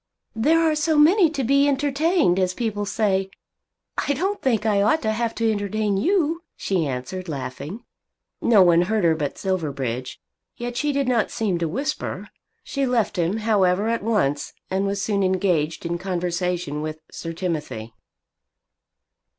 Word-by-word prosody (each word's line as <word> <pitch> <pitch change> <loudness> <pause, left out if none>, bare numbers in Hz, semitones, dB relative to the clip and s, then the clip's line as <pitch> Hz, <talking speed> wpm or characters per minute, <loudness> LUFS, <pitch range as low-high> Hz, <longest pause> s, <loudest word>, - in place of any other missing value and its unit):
"There 305 +9 +3
are 325 -1 +3
so 305 +1 +1
many 335 +4 +6
to 285 -4 -3
be, 280 +3 +4
entertained, 285 - +2
as 185 -1 0
people 210 -3 -2
say! 195 -3 0 0.7
I 285 - +1
don't 385 +8 -2
think 225 -5 +1
I 205 -2 +3
ought 215 +10 +2
to 220 - +1
have 230 +1 -1
to 225 -1 +1
entertain 205 0 -1
you," 330 - +1 0.2
she 180 -6 0
answered, 140 +8 -5
laughing. 140 - -6 0.6
No 215 -5 +6
one 170 -1 +5
heard 220 -2 +1
her 165 -1 +5
but 150 -3 -3
Silverbridge, 140 - -3 0.4
yet 240 0 -5
she 295 +4 0
did 280 -2 0
not 240 -4 +2
seem 195 -6 -1
to 170 - 0
whisper. 270 - -3 0.3
She 275 -2 -1
left 240 -4 +1
him, 175 +5 +1
however, 200 -1 +3
at 230 0 0
once, 190 -10 0 0.2
and 195 +1 +1
was 200 0 -1
soon 200 -2 0
engaged 180 -5 0
in 170 0 -2
conversation 180 -4 -2
with 155 0 -4
Sir 165 - -6
Timothy. 150 -10 -4
200 Hz, 160 wpm, -23 LUFS, 170-255 Hz, 0.7 s, many